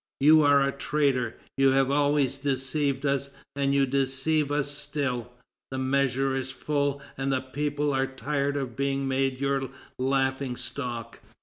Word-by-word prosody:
You 155 +3 +7
are 140 -1 +5
a - - 0
traitor. 140 -4 0 0.2
You 135 0 +5
have 135 0 +3
always 145 -2 +2
deceived 140 0 0
us, 140 0 0 0.3
and 140 -1 +1
you 140 0 +3
deceive 135 +3 +1
us 145 -1 0
still; 140 -5 -2 0.4
the 130 - -4
measure 135 0 +1
is 130 0 -2
full, 140 +1 -1 0.2
and 135 0 0
the 130 -1 +1
people 145 +2 -2
are 135 0 +1
tired 140 +2 -2
of 130 -4 -4
being 140 0 -1
made 135 -1 0
your 135 -1 0 0.3
laughing 130 0 0
stock." 120 -4 -5
135 Hz, 150 wpm, -27 LUFS, 130-145 Hz, 0.4 s, You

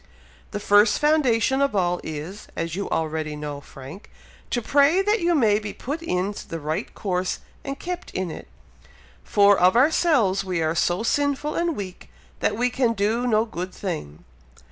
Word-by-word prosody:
"The 205 - -4
first 205 +1 +4
foundation 270 -4 +2
of 280 -6 +1
all 180 -2 +1
is, 160 +6 -7
as 165 0 -3
you 200 - -3
already 155 -1 -2
know, 145 -1 -6
Frank, 135 +8 -11 0.4
to 240 - 0
pray 285 - +3
that 420 +2 +2
you 340 0 +2
may 215 -7 +3
be 210 -1 -6
put 295 +6 -5
in 195 - -1 0.2
the 165 - -4
right 155 +1 -3
course 185 -2 -1 0.3
and 275 0 -5
kept 360 0 -5
in 185 -3 -3
it, - - -9 0.8
for 200 - +5
of 180 +4 +5
ourselves 255 - +3
we 185 -3 -2
are 160 0 +1
so 175 +4 +1
sinful 285 +3 0
and 340 -2 0
weak 185 -3 -7 0.3
that - - 0
we 245 +1 +1
can 245 -2 +1
do 225 +4 0
no 220 -1 +3
good 185 -4 -5
thing. 75 - -5
205 Hz, 170 wpm, -24 LUFS, 175-275 Hz, 0.8 s, for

